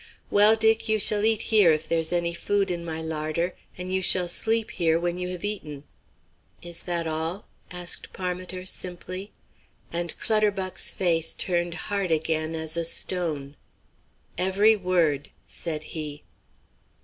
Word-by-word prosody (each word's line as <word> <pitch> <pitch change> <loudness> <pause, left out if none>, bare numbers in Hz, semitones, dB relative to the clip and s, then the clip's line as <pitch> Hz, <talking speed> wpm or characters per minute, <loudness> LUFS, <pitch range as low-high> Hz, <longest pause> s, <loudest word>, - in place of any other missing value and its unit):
"Well, 210 +2 +6
Dick, 225 0 +3
you 220 - +4
shall 205 +1 +3
eat 220 -1 +3
here, 205 -6 +7
if 155 0 0
there's 165 -1 +2
any 170 -1 0
food 200 +2 0
in 170 -1 -3
my 160 -1 -3
larder, 160 +2 -2 0.2
and 180 +1 -5
you 190 - +1
shall 180 0 +4
sleep 225 +5 +1
here 165 -2 +2
when 175 +1 -2
you 180 - -2
have 180 +1 -5
eaten." 150 -9 -4 0.8
"Is 170 -1 -3
that 170 -2 -2
all?" 160 +5 -3 0.2
asked 180 -1 -4
Parmiter, 185 0 -4
simply, 185 +2 -5 0.6
and 170 0 -2
Clutterbuck's 205 -4 +1
face 165 -3 +1
turned 175 -1 -1
hard 200 +1 -2
again 160 0 0
as 160 0 -2
a 170 - 0
stone. 160 -4 -1 0.8
"Every 200 +4 +4
word," 170 -7 +1 0.2
said 155 -3 -4
he. 150 -2 -6
175 Hz, 145 wpm, -26 LUFS, 160-190 Hz, 0.8 s, here